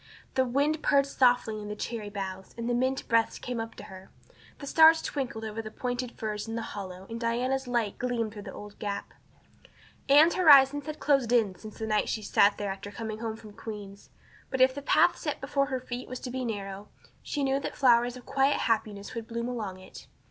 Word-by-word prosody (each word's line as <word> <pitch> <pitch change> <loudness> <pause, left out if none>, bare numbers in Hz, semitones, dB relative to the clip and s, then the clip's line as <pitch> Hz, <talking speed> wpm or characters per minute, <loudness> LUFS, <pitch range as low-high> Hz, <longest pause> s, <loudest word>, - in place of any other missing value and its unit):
The 260 - +2
wind 285 +5 +1
purred 280 -1 +4
softly 245 -5 +2
in 210 - -7
the 210 - -4
cherry 215 -1 -5
boughs, 190 -2 -6
and 235 0 -3
the 245 - +1
mint 260 +2 0
breaths 230 -1 +2
came 245 -2 -4
up 225 0 -7
to - - -10
her. 190 -1 -12 0.5
The 280 - -8
stars 320 +2 +7
twinkled 240 -6 -3
over 220 +1 -4
the 220 - -7
pointed 245 +2 -4
firs 210 -1 -4
in 225 - -4
the 230 - -3
hollow 190 -2 -7
and 230 0 -6
Diana's 250 +3 -1
light 235 -4 -1
gleamed 235 -4 -1
through 210 - -8
the - - -8
old 205 0 -11
gap. 200 -1 -4 1.0
Anne's 305 +4 +7
horizons 290 -4 +6
had 305 0 -4
closed 275 -5 +2
in 225 -6 +3
since 215 +3 -11
the 220 - -3
night 215 -1 +1
she 220 - -2
had 205 - -8
sat 200 0 +5
there 205 -1 -2
after 195 +1 -7
coming 215 +1 -6
home 225 -1 -3
from 215 -1 -13
Queen's; 205 -2 -9 0.4
but 265 - -3
if 260 0 +5
the 285 - -6
path 340 +5 +4
set 295 -3 -3
before 275 0 0
her 260 -2 -2
feet 250 0 -6
was 255 0 -5
to 250 - -5
be 255 0 -3
narrow 200 -2 -5 0.3
she 290 - -3
knew 270 0 +1
that - - -5
flowers 245 -2 +4
of 245 - -13
quiet 275 +1 +2
happiness 215 -3 -1
would 230 -2 -6
bloom 235 0 -3
along 215 -7 -4
it. 185 - -13
235 Hz, 220 wpm, -28 LUFS, 210-265 Hz, 1.0 s, stars